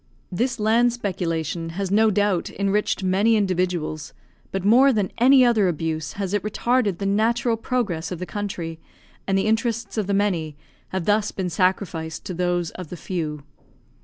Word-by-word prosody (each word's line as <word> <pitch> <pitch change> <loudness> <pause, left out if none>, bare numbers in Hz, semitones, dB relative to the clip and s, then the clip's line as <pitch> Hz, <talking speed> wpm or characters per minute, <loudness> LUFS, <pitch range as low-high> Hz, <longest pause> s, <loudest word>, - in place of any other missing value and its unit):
This 240 +6 -1
land 230 +3 +3
speculation 165 -6 -3
has 195 -2 -2
no 220 +2 +4
doubt 205 -3 +1
enriched 200 0 0
many 200 +5 +3
individuals, 180 -6 -1 0.4
but 195 0 -3
more 255 +6 +6
than 210 -6 0
any 255 +1 +6
other 220 -5 +3
abuse 160 -2 -2
has 195 -1 -4
it 205 - +1
retarded 215 -1 0
the 195 - -4
natural 225 +4 +2
progress 210 -9 -2
of 180 - -3
the 180 - -5
country, 175 -6 -5 0.5
and 195 0 +2
the 195 - +1
interests 225 0 -1
of 205 - -2
the 200 - +1
many 170 -7 0 0.3
have 185 -3 -3
thus 210 0 +2
been 185 -2 -3
sacrificed 165 -3 -1
to 185 - -4
those 175 -1 -1
of 180 -4 -9
the 180 - -7
few. 155 -5 -4
195 Hz, 165 wpm, -23 LUFS, 175-215 Hz, 0.5 s, more